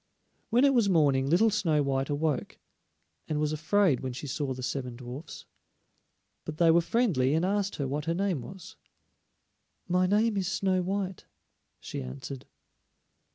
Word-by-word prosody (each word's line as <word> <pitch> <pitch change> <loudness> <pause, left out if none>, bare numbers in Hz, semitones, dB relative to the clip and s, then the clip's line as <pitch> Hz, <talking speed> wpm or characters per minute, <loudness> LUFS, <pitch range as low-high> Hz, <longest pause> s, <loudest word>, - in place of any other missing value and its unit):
When 245 +4 +4
it 275 - +4
was 230 -5 +3
morning 140 -6 +3
little 215 +8 +4
Snow 165 -8 +1
white 135 -1 -1
awoke, 145 -1 -1 0.7
and 150 -1 -1
was 150 0 0
afraid 160 -1 +2
when 130 -1 -4
she 130 - -7
saw 140 0 -3
the 130 0 -5
seven 125 -1 -3
dwarfs. 125 +5 -9 1.0
But 155 -1 -7
they 165 -1 +5
were 170 +1 +5
friendly 165 - +1
and 165 +3 +1
asked 200 +1 0
her 140 - -2
what 145 +2 -3
her 165 +1 0
name 185 -6 0
was. 195 - -11 1.1
"My 180 +1 +2
name 210 +2 +2
is 190 -2 -1
Snow 190 -2 +1
white," 190 0 -3 0.5
she - - -6
answered. 70 - -8
160 Hz, 155 wpm, -28 LUFS, 140-195 Hz, 1.1 s, they